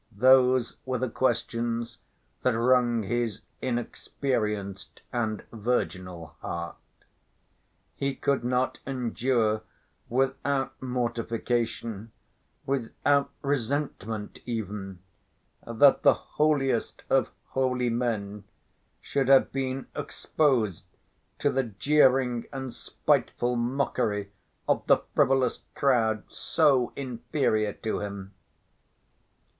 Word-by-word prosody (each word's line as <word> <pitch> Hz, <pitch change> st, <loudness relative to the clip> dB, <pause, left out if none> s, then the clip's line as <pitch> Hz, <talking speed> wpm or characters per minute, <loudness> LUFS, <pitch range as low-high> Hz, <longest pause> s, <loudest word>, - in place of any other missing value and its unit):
Those 130 Hz, 0 st, +5 dB
were 130 Hz, -1 st, -1 dB
the 125 Hz, -1 st, -2 dB
questions 115 Hz, -1 st, -1 dB, 0.4 s
that 125 Hz, -3 st, +2 dB
wrung 120 Hz, -1 st, +3 dB
his 115 Hz, 0 st, -1 dB, 0.2 s
inexperienced 110 Hz, -5 st, -3 dB
and 110 Hz, -3 st, -1 dB
virginal 95 Hz, -, -2 dB
heart. 85 Hz, -1 st, -5 dB, 1.2 s
He 140 Hz, 0 st, -1 dB
could 140 Hz, -2 st, 0 dB
not 125 Hz, +1 st, 0 dB
endure 120 Hz, -4 st, 0 dB, 0.5 s
without 135 Hz, +2 st, 0 dB
mortification, 115 Hz, -3 st, -2 dB, 0.5 s
without 140 Hz, +2 st, +1 dB
resentment 135 Hz, -6 st, -2 dB
even, 100 Hz, -5 st, -5 dB, 0.6 s
that 115 Hz, +4 st, +5 dB
the -, -, +6 dB
holiest 140 Hz, -6 st, 0 dB
of 135 Hz, -1 st, +3 dB, 0.2 s
holy 125 Hz, -2 st, +1 dB
men 105 Hz, -4 st, -2 dB, 0.6 s
should 135 Hz, -2 st, -1 dB
have 135 Hz, -1 st, +6 dB
been 130 Hz, 0 st, -2 dB
exposed 130 Hz, -, 0 dB, 0.5 s
to 145 Hz, -, +1 dB
the 135 Hz, -1 st, +1 dB
jeering 125 Hz, +1 st, +3 dB
and 130 Hz, -3 st, -5 dB
spiteful 125 Hz, 0 st, 0 dB
mockery 120 Hz, -5 st, -1 dB, 0.4 s
of -, -, +2 dB
the -, -, +7 dB, 0.2 s
frivolous 135 Hz, -3 st, +3 dB
crowd 115 Hz, -6 st, +2 dB
so 140 Hz, -6 st, +2 dB
inferior 120 Hz, -4 st, -1 dB
to 110 Hz, -, -3 dB
him. 100 Hz, -1 st, -6 dB
120 Hz, 90 wpm, -27 LUFS, 110-135 Hz, 1.2 s, the